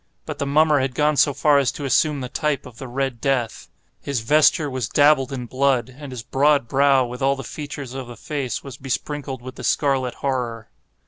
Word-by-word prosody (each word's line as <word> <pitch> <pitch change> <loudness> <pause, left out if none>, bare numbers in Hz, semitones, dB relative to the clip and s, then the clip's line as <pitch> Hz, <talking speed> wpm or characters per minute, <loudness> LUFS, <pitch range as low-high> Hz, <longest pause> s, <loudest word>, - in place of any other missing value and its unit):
But - - -6
the 140 - -1
mummer 150 +1 +4
had 130 -1 -2
gone 150 0 +2
so 145 - +4
far 145 +1 +3
as 135 -3 +1
to 145 - -6
assume 145 +1 +2
the 125 - -4
type 150 +3 -2
of 120 -3 -13
the 130 - -7
Red 125 -1 -3
Death. 130 -5 -1 0.3
His 140 -5 -2
vesture 150 +4 +4
was 130 -6 -3
dabbled 145 -2 +4
in 125 -3 -4
blood—and 130 +1 -1
his 125 -3 -6
broad 140 -1 +2
brow, 135 0 +3
with 125 +2 -8
all 135 +1 +2
the 135 - -7
features 145 -1 -7
of 130 -2 -6
the 120 -2 -10
face, 140 -1 -4
was 135 -2 -9
besprinkled 135 -1 -4
with 130 0 -9
the - - -8
scarlet 135 -4 +1
horror. 120 -5 -3
135 Hz, 205 wpm, -22 LUFS, 125-145 Hz, 0.3 s, mummer